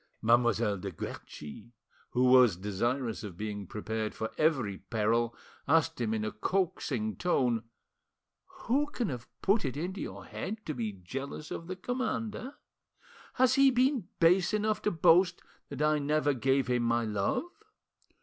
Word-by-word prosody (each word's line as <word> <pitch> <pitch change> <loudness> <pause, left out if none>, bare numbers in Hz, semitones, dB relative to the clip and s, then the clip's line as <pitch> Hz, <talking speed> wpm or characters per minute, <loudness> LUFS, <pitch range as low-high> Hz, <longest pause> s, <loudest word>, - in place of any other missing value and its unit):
Mademoiselle 115 -3 +3
de 100 +2 -4
Guerchi, 95 +6 -8 0.4
who 125 - +1
was 125 -7 +6
desirous 115 +5 -2
of 95 -5 -7
being 105 -2 -5
prepared 110 +1 -3
for 110 - -3
every 130 - +1
peril, 115 +4 0 0.3
asked 160 -2 +2
him 110 -2 0
in 110 -1 -1
a 110 - -2
coaxing 125 - -1
tone— 125 -10 +1 1.0
"Who 285 +3 +2
can 245 -6 -2
have 125 -3 -6 0.2
put 205 +3 +3
it 135 -1 -3
into 185 +5 -4
your - - -7
head 215 +2 -6
to 155 - -2
be 115 -5 -3
jealous 135 +11 -7
of 165 - -5
the 185 - -4
commander? 245 +4 -3 0.8
Has 255 0 +4
he 275 0 +6
been 255 -5 +2
base 180 +4 +4
enough 215 0 0
to - - +1
boast 175 +2 +4 0.3
that 140 +1 -3
I 150 0 +3
ever 145 0 +1
gave 135 +1 +1
him 125 0 +1
my 115 0 +1
love?" 105 - 0
130 Hz, 150 wpm, -30 LUFS, 110-180 Hz, 1.0 s, was